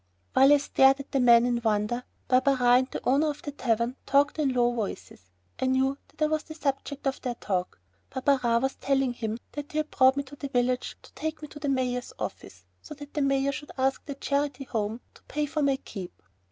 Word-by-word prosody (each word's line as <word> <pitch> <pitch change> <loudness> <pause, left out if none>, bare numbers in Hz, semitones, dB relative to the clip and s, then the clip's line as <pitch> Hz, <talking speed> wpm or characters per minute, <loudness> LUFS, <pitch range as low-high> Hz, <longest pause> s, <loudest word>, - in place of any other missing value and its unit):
While 270 +2 +6
I 290 - +8
stared 270 -1 +4
at 275 - -9
the 275 - +1
man 235 -1 +6
in 240 -1 0
wonder, 220 +2 0 0.2
Barberin 260 +1 +3
and 245 +1 +5
the - - -6
owner 285 +5 +3
of 295 0 -6
the 290 - -4
tavern 240 -2 -1
talked 285 +2 +3
in 285 -3 +2
low 245 -1 +2
voices. 200 - -6 0.3
I 260 - +2
knew 265 +1 +2
that 310 0 -4
I - - +4
was 310 0 0
the 315 - -11
subject 280 -1 -3
of 270 -1 -1
their 250 -2 -3
talk. 185 - -3 0.3
Barberin 260 -3 +1
was 270 - +1
telling 270 -2 +1
him 225 -2 -3
that 290 0 -7
he - - -2
had 310 0 -1
brought 260 +1 +4
me 280 - 0
to 280 +1 -12
the 280 - -5
village 250 -1 0
to - - -17
take 315 0 -4
me - - -5
to 295 - -10
the 290 -1 -2
mayor's 250 -2 -1
office, - - -7 0.2
so 300 - -9
that 290 0 -11
the 300 - -1
mayor 275 0 +2
should 295 +2 -7
ask 265 0 0
the 280 - -5
Charity 280 0 -1
Home 225 -2 -3
to - - -19
pay 300 0 -2
for 305 +1 -2
my 280 -2 +3
keep. 195 -8 -9
270 Hz, 225 wpm, -27 LUFS, 245-285 Hz, 0.3 s, I